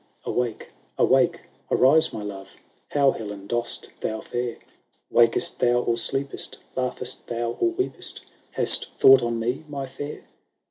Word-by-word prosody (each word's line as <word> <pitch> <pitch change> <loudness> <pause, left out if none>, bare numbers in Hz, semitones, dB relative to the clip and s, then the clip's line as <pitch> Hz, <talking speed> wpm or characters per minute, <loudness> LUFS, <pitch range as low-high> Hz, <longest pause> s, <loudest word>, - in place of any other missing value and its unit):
XXVII - - -3
"Awake, 120 -3 -2 0.3
awake, - - +4 0.3
arise 150 +5 +5
my 105 - -5
love! 95 -1 -8 0.3
How, 140 -2 +4
Helen, 105 -4 -7
dost 120 +3 -1
thou 110 0 -2
fare? 120 -1 -3 0.5
Wakest 115 -1 +3
thou, 120 0 +3
or 115 - +1
sleep'st? 135 +4 -2 0.2
laugh'st 125 -1 -3
thou, 120 0 -2
or 350 - +3
weep'st? 380 +2 -3 0.3
Hast - - +1
thought 135 -1 +8
on 120 -1 -1
me, 125 +6 -2
my 140 -2 -4
fair 145 +3 -7
120 Hz, 140 wpm, -25 LUFS, 115-135 Hz, 0.5 s, thought